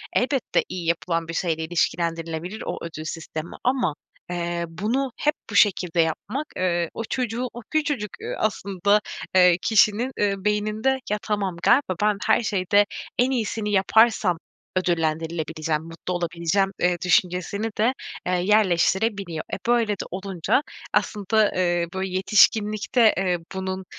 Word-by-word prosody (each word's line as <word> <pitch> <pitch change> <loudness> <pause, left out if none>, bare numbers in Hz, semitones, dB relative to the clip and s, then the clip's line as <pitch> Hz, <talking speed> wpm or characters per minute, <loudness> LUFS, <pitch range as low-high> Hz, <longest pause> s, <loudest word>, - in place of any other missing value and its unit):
Elbette 260 0 +1
iyi 180 -2 -5
yapılan 170 0 0
bir 165 - -5
şeyle 165 -2 -1
ilişkilendirilebilir 170 +2 -2
o - - -3
ödül 160 -2 -6
sistemi 160 0 -6
ama, 250 - +1 0.4
eee, 175 0 -2
bunu 225 +11 -1
hep 300 - +2 0.2
bu 205 - -6
şekilde 180 -5 +4
yapmak, 205 - -2
eee, 175 -2 0
o 225 - -4
çocuğu, 250 0 -1
o 240 - -8
küçücük, 295 - 0
eee, - - -4
aslında, 200 -1 +1 0.3
eee, 180 -2 +6
kişinin, 220 +3 +3
ııı, 200 -1 0
beyninde 215 +5 +1
"Ya, 210 - +2
tamam 200 -4 -2
galiba 245 -8 +3
ben 210 -1 +2
her - - +4
şeyde 205 0 +3 0.3
en 255 +2 +3
iyisini 220 -3 -1
yaparsam 205 -2 +3 0.4
ödüllendirilebileceğim, 160 -2 -1
mutlu 165 +2 -6
olabileceğim." 175 +2 0
eee, 180 0 +2
düşüncesini 180 +4 +1
de, 235 +5 +3 0.3
eee, 185 - +1
yerleştirebiliyor. 190 -1 +2
Eee, - - -2
böyle 240 -2 +3
de 195 - -5
olunca 190 - 0 0.3
aslında, 210 +1 +2
ııı, 175 -1 +1
bu 190 0 -2
yetişkinlikte, 210 +4 +3
eee, 185 -2 +1 0.2
bunun, 190 0 -4
190 Hz, 135 wpm, -24 LUFS, 170-215 Hz, 0.4 s, eee